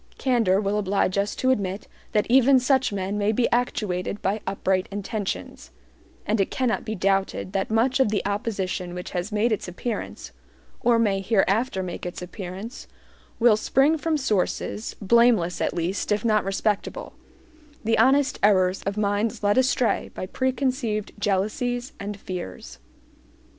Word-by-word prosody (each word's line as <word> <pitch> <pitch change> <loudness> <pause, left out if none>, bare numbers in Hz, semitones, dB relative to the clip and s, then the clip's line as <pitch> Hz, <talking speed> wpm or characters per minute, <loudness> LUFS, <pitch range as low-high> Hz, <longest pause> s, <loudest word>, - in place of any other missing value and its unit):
Candor 230 -8 +2
will 205 0 0
oblige 195 -1 0
us 200 +1 -1
to 260 - +2
admit 200 -4 -2 0.2
that 210 - +2
even 260 +2 +6
such 260 -1 +2
men 200 +1 -2
may 205 +1 +2
be 235 +2 +2
actuated 210 -5 -1
by 205 +3 0
upright 190 -1 0
intentions; 205 0 -5 0.6
and 210 0 +1
it 195 - 0
cannot 255 -3 0
be 220 -1 -4
doubted 195 0 0
that 195 -1 -1
much 235 +5 +2
of 265 - +4
the 205 -1 -1
opposition 195 -3 -2
which 180 - -6
has 180 +3 -3
made 215 +3 +1
its 215 - -1
appearance, 210 +6 -5 0.5
or 240 -1 +3
may 200 -4 +1
hereafter 200 +1 +1
make 180 -1 -6
its 180 - -5
appearance, 190 +5 -7 0.5
will 235 -2 +6
spring 270 +8 +3
from 320 0 0
sources, 215 -3 -1
blameless 220 -4 +3
at - - +1
least, 175 +5 -2
if 210 +3 +1
not 215 -2 +3
respectable 205 - -2 0.7
the 225 +1 +2
honest 270 +1 +3
errors 190 -2 +3
of 200 +1 -2
minds 210 +2 0
led 205 0 +3
astray 255 -2 +1
by - - -4
preconceived 255 -2 -1
jealousies 240 +6 -1
and 205 0 -5
fears. 95 - -7
210 Hz, 150 wpm, -24 LUFS, 195-240 Hz, 0.7 s, even